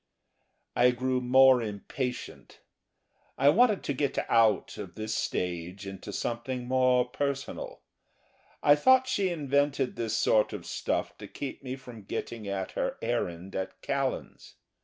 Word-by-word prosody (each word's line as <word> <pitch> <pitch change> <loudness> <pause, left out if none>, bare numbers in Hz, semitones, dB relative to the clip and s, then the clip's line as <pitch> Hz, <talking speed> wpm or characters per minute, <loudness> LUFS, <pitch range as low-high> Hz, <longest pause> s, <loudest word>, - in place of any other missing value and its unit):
I 125 +1 +5
grew 130 +1 0
more 130 0 +6
impatient. 115 +4 -5 0.8
I 140 - +5
wanted 215 +4 +4
to 140 - -1
get 140 +1 -1
out 110 -3 +3
of - - -8
this 110 0 -3
stage 90 -1 -3
into 95 +1 -7
something 120 +3 -3
more 130 -1 +3
personal. 140 +2 -4 0.8
I 145 - +7
thought 260 - +5
she 195 -6 +1
invented 140 -4 0
this 115 -2 -1
sort 105 -1 +3
of - - -6
stuff - - -2
to - - -8
keep 140 - -6
me 130 -1 -5
from 125 -4 -11
getting 115 0 -5
at 95 -1 -3
her - - -2
errand 90 +2 -2
at 95 0 -4
Callan's. 135 -1 -3
125 Hz, 140 wpm, -29 LUFS, 110-140 Hz, 0.8 s, I